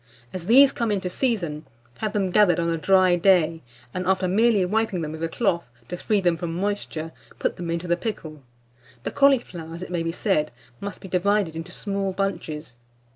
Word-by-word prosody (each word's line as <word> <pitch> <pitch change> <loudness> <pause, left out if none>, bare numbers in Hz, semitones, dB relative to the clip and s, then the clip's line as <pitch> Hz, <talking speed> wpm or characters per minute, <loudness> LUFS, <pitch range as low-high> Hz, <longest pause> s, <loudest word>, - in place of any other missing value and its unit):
As 180 -1 -6
these 270 +4 +7
come 235 -4 -1
into 185 -3 -1
season, 175 - -1 0.3
have 215 -1 -2
them 195 -3 0
gathered 200 -3 +4
on 170 0 0
a - - +1
dry 185 +1 +4
day, 170 -3 +3 0.3
and, 185 0 -3
after 190 -1 +2
merely 210 0 +3
wiping 205 -2 0
them 155 - -4
with 160 0 -7
a 165 - -1
cloth, 170 -3 0 0.2
to 180 - -4
free 210 +3 +1
them 175 -3 +1
from 165 -1 -4
moisture, 180 -4 -3 0.3
put - - -1
them 175 -1 -5
into 170 +1 -2
the 175 - +3
pickle. 165 -7 -6 0.6
The - - -3
cauliflowers, 185 - +1
it 180 - -8
may 175 -2 -1
be 165 0 -1
said, 165 -4 0 0.3
must 200 0 -6
be - - -8
divided 190 -2 +1
into 165 0 -6
small 195 -2 -2
bunches. 160 -9 -4
185 Hz, 190 wpm, -24 LUFS, 165-205 Hz, 0.6 s, these